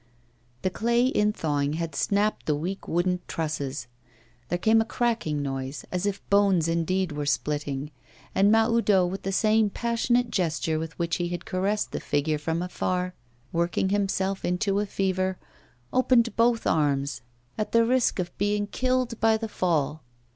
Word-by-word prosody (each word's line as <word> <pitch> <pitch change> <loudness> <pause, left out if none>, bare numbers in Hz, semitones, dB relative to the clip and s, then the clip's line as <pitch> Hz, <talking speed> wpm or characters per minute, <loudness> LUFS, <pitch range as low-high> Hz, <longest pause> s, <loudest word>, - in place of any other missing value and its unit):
The 185 - +1
clay, 235 +4 +2
in 210 -5 +2
thawing, 145 -6 -1
had 165 0 -3
snapped 205 +1 0
the 150 - +2
weak 180 +6 -4
wooden 180 +2 +1
trusses. 150 -3 -3 0.6
There 175 - 0
came 220 +5 +4
a - - +2
cracking 225 - -1
noise, 135 0 -4
as 180 +2 -1
if 200 0 -4
bones 195 -5 +4
indeed 170 +2 0
were 145 -1 -3
splitting; 145 -1 -1 0.4
and 200 +2 +4
Mahoudeau, 225 -4 +4
with 185 +2 -4
the 195 - -3
same 215 +2 +3
passionate 235 +2 0
gesture 160 -3 0
with 160 0 -6
which 170 -1 -1
he 175 - -1
had 175 0 -5
caressed 205 0 -1
the - - -3
figure 150 +1 0
from 165 +3 -1
afar, 180 0 -2 0.4
working 170 +3 0
himself 195 -1 0
into 195 +3 0
a 210 - -1
fever, 190 -1 -1 0.6
opened 250 -2 +3
both 230 0 +2
arms, 140 -4 +1 0.3
at 215 - -3
the 230 0 +4
risk 250 +1 +2
of 175 -2 -3
being 205 +1 +1
killed 255 +1 -1
by 225 0 +4
the 225 0 -4
fall. 155 -7 0
185 Hz, 160 wpm, -26 LUFS, 160-215 Hz, 0.6 s, came